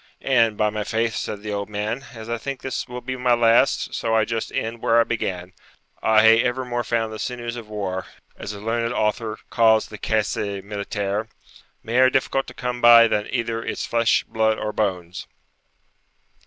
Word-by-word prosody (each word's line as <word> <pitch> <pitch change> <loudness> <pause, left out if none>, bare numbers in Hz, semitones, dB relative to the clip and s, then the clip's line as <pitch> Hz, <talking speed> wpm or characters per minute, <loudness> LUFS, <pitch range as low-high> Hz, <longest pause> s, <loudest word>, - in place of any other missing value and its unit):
'And, 115 -5 +2
by 105 -1 +2
my 105 0 -3
faith,' 115 +1 -1
said 105 -1 -4
the 105 -1 -4
old 100 0 -3
man, 105 +5 -3
'as 110 0 -9
I 120 0 -3
think 135 +2 -5
this 130 - -3
will 125 0 -7
be 130 +1 -4
my 125 -1 +2
last, 115 +2 +3
so 115 -1 0
I 110 -1 +3
just 115 0 -3
end 115 +1 -3
where 115 +1 +3
I - - +6
began: 95 -6 -4 0.5
I 110 0 +4
hae 115 +1 +7
evermore 125 -1 -2
found 115 -2 -1
the 110 - -7
sinews 120 -1 -4
of 115 -3 -9
war, 95 -3 -4 0.3
as - - -6
a 105 - -8
learned 115 +3 -1
author 110 +1 -1
calls 110 -2 +4
the 105 - -9
caisse 110 -2 0 0.3
militaire, 100 +1 -3 0.6
mair 125 +3 +4
difficult 135 +1 0
to - - -11
come 125 -1 -4
by 115 -1 +8
than 105 -2 -1
either 115 -2 -2
its - - -3
flesh, 115 -1 +2
blood, 110 0 0
or 105 0 -3
bones.' 90 -4 -3
115 Hz, 185 wpm, -23 LUFS, 105-120 Hz, 0.6 s, by